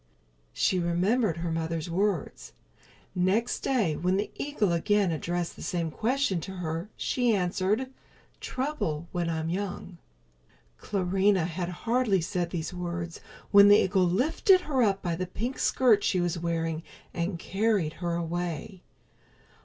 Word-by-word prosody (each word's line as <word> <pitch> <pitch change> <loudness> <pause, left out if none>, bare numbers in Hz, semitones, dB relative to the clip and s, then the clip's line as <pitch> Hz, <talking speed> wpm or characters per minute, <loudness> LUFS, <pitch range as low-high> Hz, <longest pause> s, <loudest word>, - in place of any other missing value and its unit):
She 185 - +1
remembered 180 +4 +1
her 170 0 -3
mother's 165 0 -2
words. 185 -1 -2 0.6
Next 195 +7 +1
day 215 - +1
when 180 +4 +1
the 205 - -2
eagle 280 -10 -1
again 200 +2 +2
addressed 170 +2 -2
the - - -12
same 170 -3 -2
question 225 - 0
to 190 - -7
her, 170 +1 -4
she 245 -3 +1
answered: 195 +6 0 0.5
"Trouble 255 - -3
when 175 -1 -1
I'm 160 -1 -2
young." 180 -1 -4 0.8
Clarinha 195 -1 +1
had 175 +1 -3
hardly 225 +2 +1
said 175 +1 -2
these 170 -1 -4
words 175 -1 -5 0.3
when 200 0 +8
the 205 0 +8
eagle 190 -2 +3
lifted 310 - +3
her 275 -6 0
up 200 -4 +2
by 170 -2 -1
the 180 +2 -3
pink 235 +8 -4
skirt 225 -6 +3
she 185 - +1
was 175 -1 -1
wearing 165 -1 -2 0.3
and 170 +1 -2
carried 195 -3 0
her 170 -1 -1
away. 175 +2 -4
180 Hz, 140 wpm, -28 LUFS, 170-210 Hz, 0.8 s, when